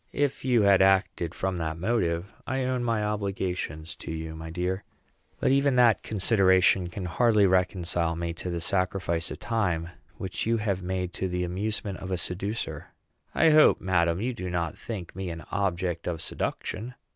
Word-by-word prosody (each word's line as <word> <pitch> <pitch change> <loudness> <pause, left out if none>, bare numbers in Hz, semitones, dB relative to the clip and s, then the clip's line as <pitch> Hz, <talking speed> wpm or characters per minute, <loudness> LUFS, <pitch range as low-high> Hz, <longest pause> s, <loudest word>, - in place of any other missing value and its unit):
"If 145 -1 0
you 125 -4 +3
had 100 -1 +5
acted 95 -3 +2
from 95 -2 -2
that 80 -1 -2
motive, 90 -1 -1
I 130 +1 -1
own 125 -1 -1
my 115 -3 0
obligations 95 -6 -3
to - - -7
you, 80 0 -5
my 80 0 -7
dear; 90 +3 -2 0.6
but - - +2
even 140 0 +3
that 120 -3 +5
consideration 95 -3 +3
can 90 +1 -5
hardly 105 +3 +3
reconcile 90 -2 +1
me 85 0 -3
to 90 - -5
the 85 -1 -3
sacrifice 90 -1 0
of - - -6
time 90 -8 -1 0.3
which 95 +3 -3
you 115 0 +3
have 100 -4 -1
made 90 0 -3
to 95 - -2
the 90 0 -2
amusement 100 +2 -3
of 95 - -7
a 95 - 0
seducer." 90 -3 -3 0.5
"I 160 - +5
hope, 155 0 +6
madam, 85 -2 +1
you 125 +2 -1
do 90 -6 -5
not 85 -2 -2
think 95 -8 -7
me 95 -1 -4
an 85 0 -6
object 90 -3 -1
of 85 -2 -2
seduction." 120 +10 -4
95 Hz, 175 wpm, -27 LUFS, 85-105 Hz, 0.6 s, hope